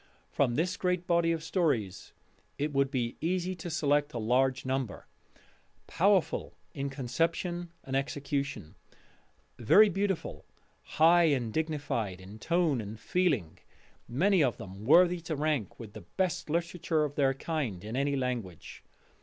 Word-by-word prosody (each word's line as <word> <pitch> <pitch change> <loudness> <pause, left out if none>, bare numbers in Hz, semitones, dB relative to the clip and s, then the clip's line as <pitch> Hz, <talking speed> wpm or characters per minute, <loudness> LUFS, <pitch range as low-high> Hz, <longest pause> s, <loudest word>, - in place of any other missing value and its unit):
From 125 -4 +1
this 175 +5 0
great 180 -1 -1
body 170 -1 +2
of 165 -1 -2
stories 125 - -1 0.5
it 145 +1 -2
would 135 0 +2
be 120 -4 -2
easy 180 +2 -1
to 175 - -6
select 145 -3 +1
a - - -1
large 130 +4 +1
number, 130 -4 -3 0.8
powerful 195 0 +1 0.2
in 140 -1 -3
conception 165 +6 -2
and 135 - -4
execution, 140 - -3 0.9
very 205 - +6
beautiful, 195 -1 -2 0.5
high 170 +2 +6
and 125 -8 0
dignified 145 - -2
in 95 +4 -12
tone 165 -4 +1
and 105 +1 -8
feeling, 145 - 0 0.5
many 175 - +3
of 125 -4 0
them 95 +3 -9
worthy 175 +5 +5
to 165 -1 -4
rank 150 - -1
with 110 -4 -9
the - - -9
best 180 -4 -2
literature 170 0 0
of 145 -2 -2
their 135 -2 +2
kind 135 - -3
in 110 +3 -5
any 140 +1 +1
language. 120 - -4
145 Hz, 140 wpm, -30 LUFS, 125-170 Hz, 0.9 s, very